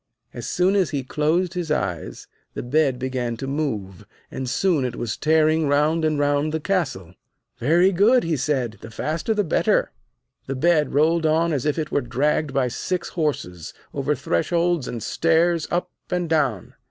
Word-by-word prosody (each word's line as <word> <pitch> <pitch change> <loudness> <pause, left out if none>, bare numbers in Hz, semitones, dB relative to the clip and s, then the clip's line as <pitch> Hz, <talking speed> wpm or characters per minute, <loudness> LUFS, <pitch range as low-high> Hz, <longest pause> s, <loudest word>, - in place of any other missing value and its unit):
As - - -6
soon 185 +3 +2
as 190 -4 +2
he 140 -3 -2
closed 160 +7 0
his 175 -3 -3
eyes, 90 - -3 0.3
the - - -4
bed 135 +1 +1
began 125 -2 -3
to 135 - -5
move, 125 - -3 0.3
and 130 -1 -4
soon 170 0 +1
it 125 -2 -3
was 115 -2 -3
tearing 155 0 +2
round 150 +3 +2
and 155 -1 +1
round 145 +1 +1
the 160 - -1
castle. 145 - -2 0.5
'Very 170 +9 +4
good!' 215 +7 +4
he 165 -1 0
said. 130 -7 -1
'The 115 - -9
faster 160 - -2
the 210 - +2
better!' 165 - +1 0.6
The 135 - -3
bed 150 0 +2
rolled 160 +2 +3
on 160 +1 +2
as 140 0 -1
if 150 - 0
it 155 -2 -3
were - - +1
dragged 145 +4 0
by 135 -2 +1
six 175 +8 -3
horses; 115 - -3 0.2
over - - 0
thresholds 170 - 0
and 115 -3 -5
stairs, 165 0 +2
up 180 +1 -1 0.2
and 180 -1 -1
down. 140 - 0
150 Hz, 175 wpm, -23 LUFS, 130-170 Hz, 0.6 s, Very